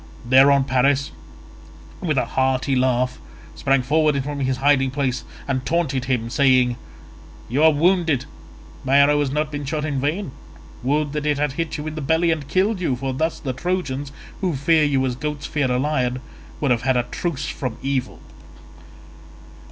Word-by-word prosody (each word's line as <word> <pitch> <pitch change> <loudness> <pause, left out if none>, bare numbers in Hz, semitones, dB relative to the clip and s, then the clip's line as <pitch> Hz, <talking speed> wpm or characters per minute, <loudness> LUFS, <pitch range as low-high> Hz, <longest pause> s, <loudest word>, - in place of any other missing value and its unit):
Thereon 135 +2 +6
Paris 135 +1 +1 0.9
with 155 -5 -1
a 125 - +2
hearty 130 +2 0
laugh 125 0 +1 0.3
sprang 135 -1 +1
forward 150 0 +2
from 145 +1 -4
his 130 -1 0
hiding 135 0 +3
place, 130 -2 -2 0.2
and 130 -2 -1
taunted 140 -6 -1
him 125 -3 -1
saying, 130 -2 +3 0.7
"You 135 +6 0
are 160 - +7
wounded—my 155 -4 -1
arrow 145 +1 +5
has 145 -2 0
not 150 +2 -1
been 145 -1 -4
shot 150 +2 -2
in 140 -4 -2
vain; 150 +3 -2 0.5
would 145 +3 0
that 150 0 -2
it 145 -1 +1
had 145 -1 0
hit 160 +3 -3
you 150 - -6
in 155 - -4
the 155 - -5
belly 160 +4 +2
and 155 -4 -3
killed 190 +6 +1
you, 135 -7 0
for 135 +1 -3
thus 160 +5 -1
the 130 -3 -3
Trojans, 145 -3 -3 0.3
who 180 -6 -1
fear 155 +3 +3
you 140 -3 +2
as 125 -2 -2
goats 150 +2 -4
fear 145 -3 -1
a 125 - +1
lion, 130 -3 0 0.4
would 140 -3 +1
have 120 -1 +2
had 130 0 +1
a 120 - +2
truce 150 +3 -4
from 125 -4 -4
evil." 135 -2 -2
140 Hz, 175 wpm, -22 LUFS, 130-150 Hz, 0.9 s, are